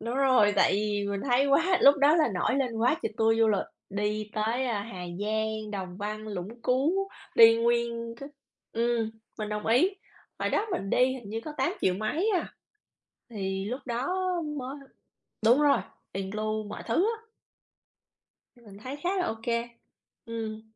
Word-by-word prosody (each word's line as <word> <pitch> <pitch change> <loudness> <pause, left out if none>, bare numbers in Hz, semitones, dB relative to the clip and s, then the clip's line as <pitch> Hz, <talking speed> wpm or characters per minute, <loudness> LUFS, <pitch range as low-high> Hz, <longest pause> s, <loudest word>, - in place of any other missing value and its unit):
Đúng 235 +2 -4
rồi. 255 -6 +4
Tại 190 - +4
vì 205 0 0
mình 200 - -2
thấy 260 +3 +4
quá 330 +7 +3
lúc 280 +1 +7
đó 290 +3 +5
là 315 -5 +3
nổi 180 +8 +1
lên 250 -4 -1
quá 240 +6 +3
tr - - +1
tour 225 0 +3
du 225 -1 +4
lịch, 205 -2 +1 0.2
đi 210 +1 -2
tới, 225 +4 0
a, 220 -5 -1
Hà 190 -4 -8 0.2
Giang, 215 0 -2
Đồng 185 -3 -5
Văn, 215 +2 -5
Lũng 210 +4 -6
Cú, 320 +10 +1 0.3
đi 230 0 +8
nguyên 235 0 0
c - - -9 0.5
ừm, 230 -1 0 0.3
mình 215 -1 -3
đồng 210 0 -4
ý. 250 +12 +4 0.5
Hồi - - -1
đó 425 - +1
mình 195 - -2
đi 250 - +4
hình 240 -6 -9
như 225 - -3
có 305 - -5
tám 265 - +1
triệu 185 - +2
mấy 295 - 0
à. 360 - -2 0.8
Thì 195 -3 -3
lúc 250 +6 -4
đó 240 +2 -2 0.5
mới 260 +1 -5 0.7
đúng 245 +6 +6
rồi, 290 -6 +4 0.3
include 215 +3 -2
mọi 210 0 -8
thứ 230 - 0 0.2
á. 450 - -21 1.4
Mình 200 -3 -13
thấy 255 +6 -6
khá 355 - 0
là 360 - +1
ô 225 - -2
kê. 235 0 -1 0.6
Ừm. 220 -1 -5
225 Hz, 175 wpm, -28 LUFS, 210-255 Hz, 1.4 s, đi